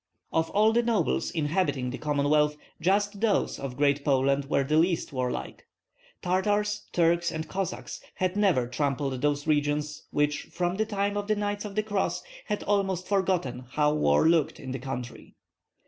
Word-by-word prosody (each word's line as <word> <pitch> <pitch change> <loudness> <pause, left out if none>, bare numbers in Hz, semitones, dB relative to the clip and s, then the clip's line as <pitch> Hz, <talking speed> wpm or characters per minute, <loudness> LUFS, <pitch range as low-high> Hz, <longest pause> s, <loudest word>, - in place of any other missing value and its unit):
Of 160 0 +1
all 215 +2 +3
the 235 - +4
nobles 225 -8 0
inhabiting 150 -5 0
the 130 - -6
Commonwealth 150 0 +2 0.2
just 205 +3 +1
those 225 -3 +1
of 135 -2 -5
Great 140 0 +2
Poland 140 0 +2
were 140 0 +1
the 150 +3 +1
least 170 -2 +1
warlike. 125 -1 -4 0.6
Tartars, 205 +3 0
Turks, 170 0 +2
and 160 -1 -4
Cossacks 190 -2 -4
had 185 0 -1
never 190 -12 +3
trampled 135 0 -2
those 145 0 0
regions 150 0 0
which 150 0 0
from 175 +1 -2
the 220 0 0
time 205 -1 -1
of 205 0 -3
the 215 - +2
Knights 205 0 -2
of 200 -1 -7
the 215 - +1
Cross 205 -2 -1 0.2
had 210 -1 -2
almost 190 -3 0
forgotten 180 -11 0
how 150 0 +3
war 75 - +3
looked 160 -2 +2
in 130 -3 -6
the 130 - -4
country. 125 -2 -7
160 Hz, 165 wpm, -27 LUFS, 145-200 Hz, 0.6 s, the